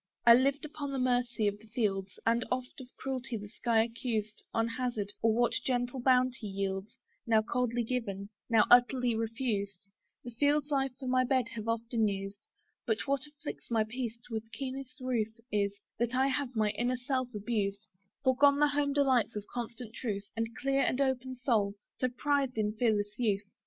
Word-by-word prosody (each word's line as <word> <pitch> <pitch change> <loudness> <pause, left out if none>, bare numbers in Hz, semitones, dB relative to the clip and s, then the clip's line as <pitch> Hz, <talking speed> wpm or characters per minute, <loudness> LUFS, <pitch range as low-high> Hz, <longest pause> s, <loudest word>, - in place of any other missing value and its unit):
I 235 - +10
lived 275 +4 +3
upon 295 -1 -5
the 275 - -2
mercy 245 -3 +1
of 205 0 -1
the 220 - -17
fields, 200 -5 -1
And 235 +1 +3
oft 255 +3 -3
of 255 - -10
cruelty 260 -3 -3
the 205 0 -7
sky 225 +1 +2
accused; 225 -3 -3
On 225 0 +1
hazard, 230 -4 -2
or 225 - +4
what 240 +2 +2
general 245 0 0
bounty 255 -2 +3
yields, 195 0 -3 0.3
Now 220 -1 +4
coldly 240 +1 0
given, 205 -5 -3 0.2
now 225 -2 +5
utterly 245 0 +5
refused, 220 -4 -2 0.4
The 245 - -7
fields 290 +4 +1
I 270 -1 +2
for 260 - -5
my 255 0 +3
bed 255 -2 +1
have 230 -3 -6
often 230 -1 +1
used: 195 0 -5 0.4
But, 220 -1 0
what 280 0 0
afflicts 295 +1 -8
my 225 -2 +3
peace 235 +1 -4
with 225 -1 -5
keenest 265 0 -6
ruth 230 -3 -1
Is, 200 -1 0 0.2
that 240 +1 0
I 265 +1 +3
have 265 -2 -2
my 215 -1 +2
inner 245 +4 0
self 255 0 -1
abused, 205 -1 -1 0.4
Foregone 280 +2 +5
the 295 0 +4
home 285 0 +1
delight 260 -5 +3
of 210 -1 -4
constant 235 -1 -5
truth, 210 -5 -3
And 225 0 -3
clear 275 0 +1
and 255 - +1
open 260 -1 0
soul, 220 -6 +1 0.2
so 255 - +2
prized 275 -1 0
in 210 -1 +1
fearless 210 -2 0
youth. 210 -4 +1
240 Hz, 175 wpm, -31 LUFS, 215-260 Hz, 0.4 s, I